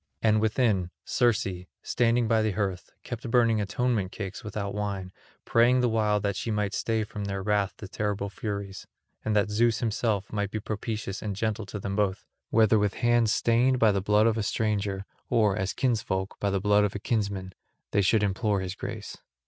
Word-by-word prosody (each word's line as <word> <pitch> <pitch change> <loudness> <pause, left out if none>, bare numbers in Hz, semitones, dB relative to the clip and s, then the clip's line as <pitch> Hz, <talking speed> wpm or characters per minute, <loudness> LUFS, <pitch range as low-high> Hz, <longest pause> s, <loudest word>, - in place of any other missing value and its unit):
And 110 -1 +4
within, 110 -5 +1 0.2
Circe, 120 -2 +2 0.4
standing 120 -1 +2
by 110 -1 +3
the 110 -2 0
hearth, 95 -2 -2
kept 120 -1 -6
burning 115 -2 +3
atonement 105 -1 0
cakes 95 -3 -6
without 100 -1 -4
wine, 100 -3 -3 0.3
praying 120 +2 +4
the 125 - +2
while 105 -2 +2
that 100 -1 -1
she - - -3
might 105 -2 -1
stay 110 -1 0
from 105 -1 -6
their 100 -1 -3
wrath 100 -1 +1
the 110 - -8
terrible 100 0 -2
Furies, 100 -1 -5 0.4
and 110 - 0
that 105 -1 +2
Zeus 115 +1 +3
himself 110 -3 -1
might 100 -2 -1
be 110 - -3
propitious 105 -1 -4
and 105 -2 -3
gentle 110 0 -2
to 105 - -5
them 100 0 -3
both, 100 -2 0 0.2
whether 110 -1 +4
with 105 -1 0
hands 120 -2 +3
stained 120 +4 +3
by 115 -3 +5
the 100 -1 0
blood 105 +2 +3
of 115 -1 +2
a - - +1
stranger 100 -2 -1 0.2
or, 105 -4 +3
as 95 -2 -1
kinsfolk, 105 -6 -1
by 100 - 0
the 100 0 0
blood 105 +1 +4
of 105 -1 -1
a - - -2
kinsman, 100 -4 -2 0.4
they 100 - +3
should 105 +2 +3
implore 100 0 0
his 95 -1 -4
grace. - - -6
105 Hz, 190 wpm, -27 LUFS, 100-110 Hz, 0.4 s, by